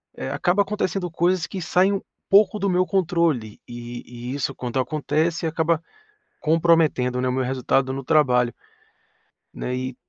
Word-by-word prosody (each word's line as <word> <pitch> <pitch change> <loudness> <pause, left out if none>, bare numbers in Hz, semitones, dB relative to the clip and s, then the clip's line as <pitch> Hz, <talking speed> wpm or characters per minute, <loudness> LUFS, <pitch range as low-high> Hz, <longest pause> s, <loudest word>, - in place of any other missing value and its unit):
eh, - - -5
acaba 190 +3 +2
acontecendo 195 -3 -2
coisas 175 +1 +1
que 190 - -6
saem 185 +4 +2
um 195 - -2 0.3
pouco 205 +1 +5
do 200 - 0
meu 180 0 +2
controle 170 - 0
e 120 +1 -8
e - - -3
isso 135 -1 -2
quando 125 +1 -3
acontece 155 +5 -1
acaba 160 0 +1 0.6
comprometendo, 155 -6 +2
né, 130 - 0
o 125 - +1
meu 130 0 0
resultado 130 +1 0
no 135 0 -5
trabalho. 125 -6 +3 1.0
Né, 125 - -4
e 130 0 -4
155 Hz, 155 wpm, -23 LUFS, 125-175 Hz, 1.0 s, pouco